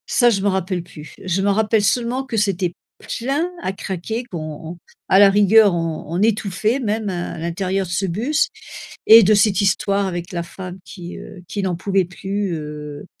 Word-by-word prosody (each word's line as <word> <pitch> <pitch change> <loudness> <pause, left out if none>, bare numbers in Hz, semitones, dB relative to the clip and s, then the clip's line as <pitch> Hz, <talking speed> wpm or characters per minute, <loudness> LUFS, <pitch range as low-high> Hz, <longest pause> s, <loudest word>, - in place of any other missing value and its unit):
Ça, 240 -2 +4
je 200 -4 +1
m'en 200 - +2
rappelle 185 -2 -2
plus. 155 -3 -12
Je 185 0 0
me 200 - +2
rappelle 215 +1 +2
seulement, 240 +5 0
que 235 -4 -4
c'était 190 -4 0 0.5
plein 280 +8 -1
à - - -1
craquer, 195 +5 -4
qu'on 180 -9 -6
on 155 +2 -7 0.3
à 190 - +5
la 200 -1 +8
rigueur, 205 0 +5
on 165 -2 -3
on 170 +4 -2
étouffait 215 +2 +1
même, 220 -3 -1
heu, - - -2
à 175 -1 -4
l'intérieur 185 +4 -2
de - - -8
ce 190 +3 0
bus 230 - 0 0.6
et 225 +1 +10
de 210 +3 +4
cette 200 -2 +3
histoire 200 0 +1
avec 175 -1 -5
la 170 -2 -3
femme 185 +1 -9
qui, 180 -2 -9
heu, 185 - -11
qui 205 - -3
n'en 185 -2 0
pouvait 190 +1 0
plus, 195 +2 -3
heu 150 -1 -7
195 Hz, 195 wpm, -20 LUFS, 175-210 Hz, 0.6 s, et